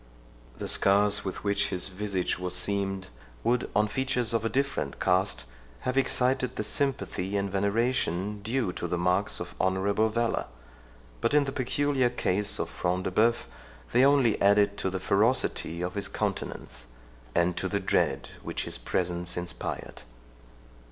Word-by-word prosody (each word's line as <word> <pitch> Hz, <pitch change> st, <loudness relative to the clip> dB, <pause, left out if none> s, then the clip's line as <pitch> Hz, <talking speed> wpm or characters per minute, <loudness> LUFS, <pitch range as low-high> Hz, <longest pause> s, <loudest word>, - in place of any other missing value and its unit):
The -, -, -5 dB
scars 100 Hz, +1 st, +4 dB
with 95 Hz, -, -5 dB
which 100 Hz, -1 st, +1 dB
his 90 Hz, -, -1 dB
visage 95 Hz, -2 st, -2 dB
was 90 Hz, 0 st, -1 dB
seamed, 95 Hz, 0 st, -1 dB, 0.3 s
would, 120 Hz, +1 st, +1 dB
on 105 Hz, +1 st, +3 dB
features 125 Hz, 0 st, 0 dB
of 115 Hz, -1 st, +1 dB
a 115 Hz, -, 0 dB
different 135 Hz, +2 st, -1 dB
cast, 95 Hz, -5 st, +1 dB, 0.4 s
have 130 Hz, -, -2 dB
excited 130 Hz, -1 st, +1 dB
the -, -, -2 dB
sympathy 105 Hz, -5 st, -1 dB
and 100 Hz, -1 st, -2 dB
veneration 100 Hz, -1 st, 0 dB
due 110 Hz, -2 st, -1 dB
to 90 Hz, -, -4 dB
the 90 Hz, -, -1 dB
marks 90 Hz, +3 st, +1 dB
of -, -, -6 dB
honourable 100 Hz, +4 st, +1 dB
valour; 115 Hz, +1 st, -1 dB, 0.7 s
but, -, -, +2 dB
in 150 Hz, -, +5 dB
the 135 Hz, -, -3 dB
peculiar 135 Hz, 0 st, +1 dB
case 105 Hz, -4 st, +3 dB
of -, -, -1 dB
Front 90 Hz, +1 st, -2 dB
de 95 Hz, -, -2 dB
Bœuf, 115 Hz, +5 st, +3 dB, 0.5 s
they 125 Hz, -, +4 dB
only 135 Hz, -5 st, +4 dB
added 100 Hz, 0 st, +4 dB
to 95 Hz, -, -1 dB
the 95 Hz, 0 st, -3 dB
ferocity 100 Hz, -4 st, +1 dB
of 90 Hz, -, -3 dB
his 100 Hz, -, -2 dB
countenance, -, -, -4 dB, 0.5 s
and 85 Hz, 0 st, +2 dB
to 95 Hz, -, -1 dB
the 100 Hz, +1 st, -1 dB
dread 95 Hz, -, 0 dB
which -, -, -3 dB
his -, -, -3 dB
presence 85 Hz, +6 st, -1 dB
inspired. 90 Hz, 0 st, -4 dB
100 Hz, 155 wpm, -28 LUFS, 95-120 Hz, 0.7 s, in